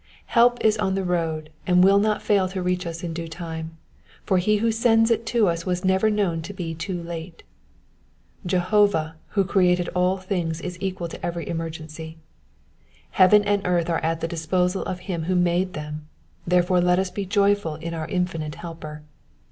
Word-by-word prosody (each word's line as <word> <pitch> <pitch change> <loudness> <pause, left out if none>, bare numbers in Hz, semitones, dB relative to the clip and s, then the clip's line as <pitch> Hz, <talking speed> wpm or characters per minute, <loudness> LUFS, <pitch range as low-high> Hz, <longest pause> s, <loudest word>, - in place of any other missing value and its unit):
Help 240 0 +5
is 215 0 +3
on 190 -2 0
the 195 - -1
road, 165 -3 -2 0.2
and 180 0 +5
will 195 +1 +6
not 215 +1 0
fail 195 -3 +2
to 190 0 -4
reach 180 0 -1
us 165 +1 -6
in 170 -2 -3
due 165 0 -5
time, 160 -1 -7 0.5
for 190 -2 +2
he 210 +4 +2
who 225 +2 +1
sends 225 0 +3
it 230 0 0
to 230 -4 +3
us 170 -1 -1
was 180 +1 -2
never 190 +3 +3
known 195 -6 0
to 175 +5 -7
be 170 -3 -4
too 170 +2 -4
late. 165 0 -7 1.0
Jehovah 180 -3 +2 0.2
who 195 - +5
created 180 -2 +2
all 180 +1 +1
things 180 -4 -2
is 180 +1 -5
equal 185 -3 -3
to - - -10
every 170 -2 -3
emergency; 160 -1 -6 0.9
heaven 200 +2 +6
and 205 0 +1
earth 175 -2 +1
are 165 - +1
at 165 0 -1
the 165 - -1
disposal 180 +3 0
of 180 -1 -4
him 175 -4 -4
who 185 +2 0
made 180 +1 +1
them, 150 0 -6 0.4
therefore 180 0 +3
let 180 0 +3
us 190 -1 0
be 205 - -4
very - - -14 0.2
joyful 165 -7 -4
in 165 +2 -6
our 160 -1 -4
infinite 165 -4 -2
helper. 155 -3 -8
180 Hz, 190 wpm, -24 LUFS, 165-190 Hz, 1.0 s, will